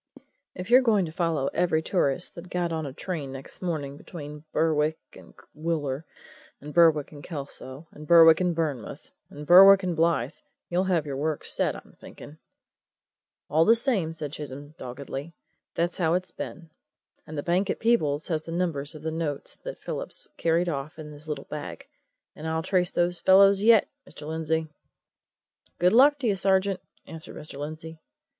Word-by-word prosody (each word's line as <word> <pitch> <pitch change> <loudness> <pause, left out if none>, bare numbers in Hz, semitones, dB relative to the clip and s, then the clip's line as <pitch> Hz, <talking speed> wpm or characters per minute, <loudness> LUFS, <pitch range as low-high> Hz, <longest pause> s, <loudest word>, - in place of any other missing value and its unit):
"If 185 +5 -7
you're 255 +2 +8
going 215 -7 +2
to 160 - -7
follow 165 -5 -1
every 160 -3 +1
tourist 175 -2 0
that 175 +1 -10
got 175 -1 -1
on 160 -2 -3
a - - -6
train 150 -1 -5
next 135 0 -9
morning 150 -6 -3
between 150 -2 -9
Berwick 155 -1 +1 0.2
and - - -15 0.2
Wooler, 155 -3 -3 0.5
and 150 +1 -9
Berwick 160 -4 +4
and 145 -2 -12
Kelso, 140 -1 -8
and 150 0 -12
Berwick 165 0 +7
and 180 -2 +1
Burnmouth, 150 -8 -4 0.2
and 150 +1 -9
Berwick 195 +3 +8
and 180 -2 -1
Blyth, 165 +1 0 0.3
you'll 180 +2 +1
have 175 -5 +1
your 140 -2 -4
work 155 +1 -2
set, - - +1
I'm - - -13
thinking!" 150 +2 -12 1.1
"All 155 +3 +3
the 225 +6 +5
same," 225 - 0
said 155 -3 -6
Chisholm 145 0 -7
doggedly, 135 +4 -7 0.4
"that's 175 +2 -1
how 165 -1 +2
it's 185 0 -3
been. 165 -3 -8 0.6
And 155 -1 -7
the 145 - -2
bank 180 +3 +1
at - - -2
Peebles 155 -11 +1
has 160 -2 -1
the 165 - -8
numbers 165 -4 -2
of 155 - -11
the 160 - -2
notes 155 -3 -3
that - - -8
Phillips - - -3
carried 170 +2 +1
off 150 -1 -4
in 155 -1 -9
his 150 +1 -12
little 150 - -4
bag 150 -1 -7 0.5
and 155 - -7
I'll 160 0 -1
trace 180 -2 +1
those 175 0 0
fellows 195 +1 +6
yet, 220 -1 +5 0.2
Mr. 150 - -10
Lindsey." 160 0 -1 1.1
"Good 180 +3 +3
luck 285 +5 +6
to 270 -4 -2
you, 205 - +2
sergeant!" 190 0 +1 0.3
answered 160 -1 -9
Mr. 150 -2 -9
Lindsey. 155 +2 -7
160 Hz, 175 wpm, -26 LUFS, 150-180 Hz, 1.1 s, you're